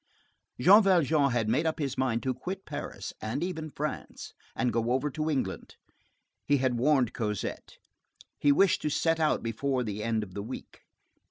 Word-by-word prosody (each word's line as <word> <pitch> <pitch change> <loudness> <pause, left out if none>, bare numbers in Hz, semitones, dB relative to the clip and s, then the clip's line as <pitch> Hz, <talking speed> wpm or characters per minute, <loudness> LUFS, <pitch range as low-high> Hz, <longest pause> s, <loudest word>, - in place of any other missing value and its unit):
Jean 195 - +8
Valjean 160 -7 +3
had 120 -3 0
made 140 +9 +2
up 160 - -1
his 140 -4 -2
mind 120 -3 0
to 130 - 0
quit 185 +9 -6
Paris, - - -6
and 115 +8 -2
even 160 -3 -4
France, 150 +1 -5 0.2
and 125 -3 0
go 115 +1 0
over 140 +3 0
to 155 +2 -2
England. 145 -4 -3 0.7
He 145 - +4
had 130 -2 0
warned 130 -2 +3
Cosette. 105 -4 -4 0.6
He 145 - +4
wished 190 +6 +4
to 150 - -1
set 165 +2 +1
out 155 -1 +1
before 125 +3 -1
the 105 -2 -4
end 110 -1 0
of 95 -3 -10
the 100 - -4
week. 115 +6 -8
135 Hz, 175 wpm, -29 LUFS, 115-155 Hz, 0.7 s, Jean